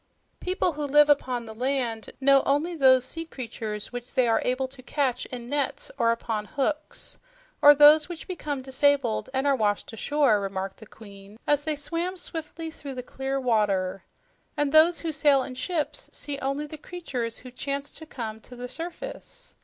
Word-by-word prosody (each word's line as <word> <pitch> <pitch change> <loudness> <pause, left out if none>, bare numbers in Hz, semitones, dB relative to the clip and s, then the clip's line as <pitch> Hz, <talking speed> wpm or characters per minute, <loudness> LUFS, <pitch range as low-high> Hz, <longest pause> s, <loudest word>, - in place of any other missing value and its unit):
"People 365 -1 0
who 300 -1 -4
live 295 +1 +6
upon 250 -4 0
the 220 - -8
land 245 -2 -1
know 275 0 +5
only 305 +5 +1
those 260 -4 +5
sea 330 +5 -4
creatures 225 -8 -6
which 245 0 -7
they 255 -2 +4
are 225 - +3
able 255 +1 0
to 260 0 -13
catch 260 -2 -1
in 240 -2 -7
nets 285 +1 -2
or 230 -4 +3
upon 225 -2 -2
hooks 300 +3 -3 0.4
or 290 0 +9
those 300 +2 +7
which 345 -2 -7
become 295 -7 -4
disabled 265 -3 +2
and 265 +1 -1
are 280 -1 +4
washed 210 -2 0
ashore," 275 -1 +2
remarked 195 -1 -4
the 220 - -13
Queen 200 -1 -13
as 290 0 +2
they 310 -1 0
swam 335 +5 -3
swiftly 325 -1 -6
through 280 -3 -8
the 250 - -5
clear 270 +2 -3
water. 200 -6 +1 0.5
"And 290 -1 +1
those 320 +3 +5
who 330 - -2
sail 285 -2 +4
in 255 - -7
ships 305 +4 -3
see 285 -1 -5
only 275 +2 -2
the 300 0 -9
creatures 260 -10 -5
who 255 - -11
chance 280 +3 -4
to 315 - -10
come 220 -6 -6
to 250 - -13
the 245 0 -6
surface. 355 - -7
275 Hz, 180 wpm, -26 LUFS, 240-295 Hz, 0.5 s, or